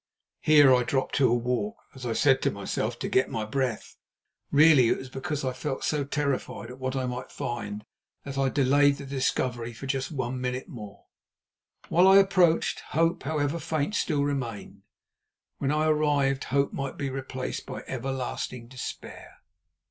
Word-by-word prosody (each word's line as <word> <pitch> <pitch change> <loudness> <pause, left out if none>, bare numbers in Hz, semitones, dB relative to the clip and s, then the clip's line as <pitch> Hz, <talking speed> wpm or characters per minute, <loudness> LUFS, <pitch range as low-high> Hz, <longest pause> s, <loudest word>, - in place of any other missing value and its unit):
Here 145 -4 +7
I 125 - +4
dropped 130 +2 -1
to 130 -3 +4
a - - +3
walk, 125 - -1 0.2
as 130 -2 -7
I 115 - 0
said 135 +2 +3
to - - +2
myself—to 110 +3 -3
get 130 - +2
my 110 -1 -3
breath. 125 0 -3 0.5
Really 145 -5 +6
it - - +2
was 130 - -8
because 140 +1 -3
I 130 - -1
felt 135 +1 -4
so 150 -2 0
terrified 140 -4 -2
at 125 - -11
what 130 0 -3
I 130 -1 -1
might 125 0 -5
find 105 -3 -5 0.4
that 140 -1 -6
I 135 -1 +1
delayed 140 +1 +3
the 140 - -8
discovery 125 -3 -1
just 135 +2 -3
for 160 - -9
one 130 -1 -3
minute 125 0 -3
more. 105 -4 -10 0.8
While 180 +3 +5
I 195 +1 +8
approached, 185 -4 +3
hope, 165 +2 0
however 150 +1 -1
faint, 155 +2 -2
still 150 -8 +1
remained; 120 -8 -4 0.8
when 135 - 0
I 155 +1 +1
arrived, 145 -3 +2
hope 140 +1 0
might 135 -1 -4
be 140 -2 -3
replaced 130 -1 -5
by - - -6
everlasting 125 -2 -4
despair. 130 -1 -8
135 Hz, 165 wpm, -27 LUFS, 125-145 Hz, 0.8 s, I